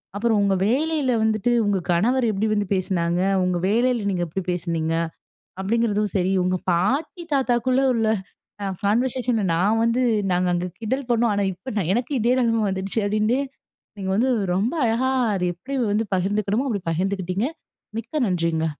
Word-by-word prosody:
"அப்பறம் 220 0 +1
உங்க 195 -1 +2
வேலையில 290 +1 +1
வந்துட்டு 220 +2 +1
உங்க 200 -2 +1
கணவர் 235 +8 +2
எப்படி 210 +2 -1
வந்து 205 -2 0
பேசுனாங்க, 180 -2 0 0.2
உங்க 180 -1 0
வேலையில 235 -1 +1
நீங்க 175 -2 -1
எப்படி 185 +4 -4
பேசுனீங்க." 165 -2 -2 0.7
அப்படீங்கிறதும் 210 -1 0
சரி, 185 +1 +1
"உங்க 185 0 +1 0.2
பாட்டி 280 - 0
தாத்தாவுக்குள்ள 255 -1 +2
உள்ள 225 -1 +1 0.6
அ - - -2 0.2
கான்வர்சேஷன்ல 240 +1 +1
நான் 205 +6 +2
வந்து 230 +2 +1 0.3
நாங்க 180 +1 +1
அங்க 175 +1 -1
கிண்டல் 250 +4 -2
பண்ணோம், 235 -1 +2
ஆனா 200 - +1
இப்ப 190 +9 -8
நான் 185 -3 0
எனக்கு 245 +4 -2
இதே 240 +2 +3
நெலைமை 230 -2 +2
வந்துட்ச்சு." 195 +3 -2
அப்படீன்டு 215 +5 +1 0.6
நீங்க 190 -1 -4
வந்து 245 +5 +2 0.3
ரொம்ப 215 - 0
அழகா 230 +3 +1 0.3
அத 185 -2 -1
எப்படி 255 +11 -9 0.2
வந்து 210 +2 +1
பகிர்ந்துக்கணுமோ, 205 +6 0
அப்படி 205 -6 -2
பகிர்ந்துக்கிட்டீங்க. 190 +4 -1 0.5
மிக்க 260 +6 -3
நன்றிங்க. 165 -3 0
210 Hz, 155 wpm, -23 LUFS, 185-240 Hz, 0.7 s, இதே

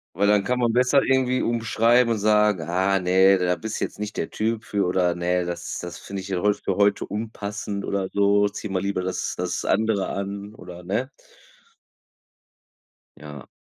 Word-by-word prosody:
weil 100 +2 +2
dann 105 -1 +4
kann 125 +2 -1
man 120 -2 +1
besser 125 +3 +3
irgendwie 130 -1 +1
umschreiben 115 +1 +2
und 110 - -3
sagen: 105 -2 +3
„Ah, 95 +2 +1
ne, 95 +2 +4
da 90 -1 +1
bist 105 +6 -5
jetzt - - -4
nicht 105 0 -5
der - - -2
Typ 110 +1 -2
für,“ 100 -3 -1
oder: 90 -1 +1
„Ne, 90 0 0
das 85 0 -5
das 85 -1 -7
finde 100 -1 -6
ich 95 - -9
ja 90 -2 -1
heu 105 0 +3
für 100 -2 -3
heute 100 0 +2
unpassend 105 -1 -5
oder 95 -1 -2
so, 100 0 +3
zieh 105 +1 -7
mal 95 -1 -1
lieber 100 -2 -1
das 95 - -3
das - - -2
andere 110 -1 +1
an“ 100 +1 -5
oder 90 -2 -11
ne? 115 +9 -2 2.1
Ja. 75 -2 -10
100 Hz, 180 wpm, -24 LUFS, 95-110 Hz, 2.1 s, dann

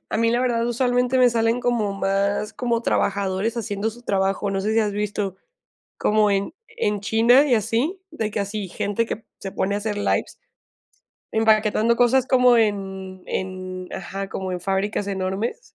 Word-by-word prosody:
A - - -1
mí 230 +1 +2
la 240 +1 +1
verdad, 235 -2 +1
usualmente, 250 +1 +1
me 250 -1 +6
salen 230 +1 +1
como 235 -5 0
más 200 +2 0
como 235 +1 -1
trabajadores 200 +3 0
haciendo 215 -1 -2
su 240 +2 -14
trabajo. 195 -1 0
No 195 0 -1
sé 215 +2 -1
si 225 - +3
has 210 -2 0
visto 205 -2 -2 0.6
como 210 -1 +3
en 195 0 -1 0.2
en 210 - -1
China 235 +6 +5
y 255 - +3
así, 235 - -1
de 220 -9 -3
que - - -2
así 200 0 -3
gente 205 +5 -1
que 225 0 -5 0.2
se 195 - -6
pone 200 +1 -1
a - - 0
hacer 210 0 -3
lives 205 - -1 0.9
empaquetando 220 +1 +3
cosas 250 +2 +3
como 250 -2 +5
en 190 -3 -2
en 185 -1 -5
ajá, 195 +1 -5
como 185 -1 -4
en 180 - -3
fábricas 195 +2 -1
enormes. 190 - -2
210 Hz, 170 wpm, -23 LUFS, 195-235 Hz, 0.9 s, me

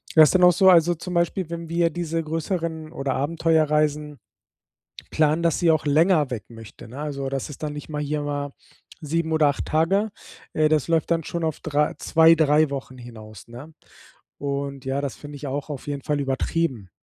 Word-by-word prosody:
das 155 -1 +9
ist - - -1
dann 180 - +4
auch 180 - +8
so, 190 +2 +5
also 175 -1 +5
zum 180 +2 -7
Beispiel, 170 0 0
wenn 170 -1 -6
wir 170 0 +2
diese 165 0 -3
größeren 160 0 -3
oder 135 -5 -2
Abenteuerreisen 150 -1 0 0.9
planen, 155 +1 +2
dass 165 -3 +1
sie 170 -2 +3
auch 155 - -1
länger 155 0 +3
weg 115 -4 -5
möchte, 115 -1 -12
ne? 130 +5 -9
Also, 140 -2 -4
das 135 +1 -4
ist 150 - -11
dann 150 - -3
nicht 145 - -8
mal 150 -1 -3
hier 150 +1 -2
mal 145 -1 -3 0.5
7 160 +2 -1
oder 155 -2 +4
8 140 - -3
Tage, 195 +7 +1 0.4
äh, 155 0 +3
das 155 -2 +1
läuft 165 -1 +1
dann 165 -1 +1
schon 170 +3 -4
auf 160 -2 -2
drei 150 0 0
zwei, 165 0 +5
drei 155 -1 +3
Wochen 135 -2 -6
hinaus, 110 -4 -12
ne? 125 +7 -11 0.7
Und 140 -1 -4
ja, 135 +1 -1
das 140 -2 -4
finde 145 0 -10
ich 145 - -7
auch 140 +3 -4
auf 140 -3 -6
jeden 140 -1 -4
Fall 145 +1 -1
übertrieben. 135 - -2
150 Hz, 195 wpm, -23 LUFS, 140-165 Hz, 0.9 s, das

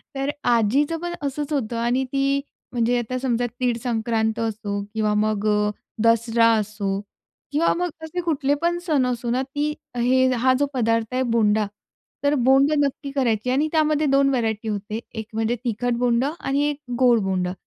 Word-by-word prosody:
तर 275 +1 -1 0.2
आजीचं 245 +8 +2
पण 345 0 -3
असंच 285 +1 -3
होतं 235 -4 -1
आणि 240 +3 +1
ती 275 0 +1 0.3
म्हणजे 240 0 +1
आता 255 +2 -3
समजा 245 -2 0
तीळ 245 -2 +1
संक्रांत 225 -1 0
असो 210 -2 -2
किंवा 215 -1 +1
मग 215 0 0
अ, 210 0 +2 0.3
दसरा 230 0 +4
असो 205 -2 -2 0.5
किंवा 305 +4 +2
मग 355 0 -1
असे 320 +3 -4
कुठले 285 -5 0
पण 345 +1 +1
सण 305 -7 +1
असो 240 -1 -2
ना, 250 +2 +1
ती 290 +2 -2 0.2
हे 255 +2 +3
हा 255 +2 +3
जो 285 - +3
पदार्थ 230 -1 0
आहे 255 - +1
बोंडा, 220 -3 +2 0.6
तर 285 +1 +3
बोंडं 275 +3 +4
नक्की 280 0 -1
करायची 250 -4 0
आणि 280 +4 +2
त्यामध्ये 310 -1 +2
2 275 0 +4
व्हेरायटी 225 -4 -1
होते. 210 +1 -3
एक 220 -1 -5
म्हणजे 225 +2 0
तिखट 240 +1 0
बोंडं 245 +3 +1
आणि 280 -6 0
एक 290 - -3 0.2
गोड 245 -3 +5
बोंडं. 185 -2 -1
245 Hz, 170 wpm, -23 LUFS, 220-275 Hz, 0.6 s, गोड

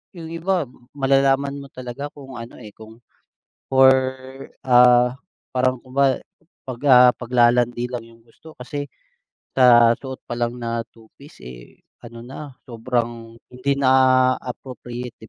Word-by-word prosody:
yung 165 -2 -9
iba 175 +1 -1 0.3
malalaman 135 0 +1
mo 140 - -10
talaga 130 +2 -7
kung 135 -4 -10
ano, 115 - -10
eh, 105 - -11
kung 110 +2 -15 0.7
for, 130 0 +6 0.7
ah 125 -1 +5 0.4
parang 130 -1 0
kunware 135 0 0 0.4
'pag, 125 -2 -7
ah, 125 -1 +8
paglalandi 120 0 +1
lang 120 -2 -5
yung 115 0 -20
gusto 135 +7 -17
kasi 145 +3 -6 0.7
sa 120 -3 +6
suot 130 -1 -8
pa - - -6
lang 120 0 -2
na 115 -1 -3
two 115 -1 -20
piece, 140 +2 -16
eh, - - -13 0.3
ano 115 0 -11
na, 135 +1 -10
sobrang 115 -1 -4 0.2
hindi 130 +3 -1
na 130 -2 +3 0.5
appropriate 125 -1 -8
'di 110 - -13
125 Hz, 135 wpm, -21 LUFS, 120-135 Hz, 0.7 s, ah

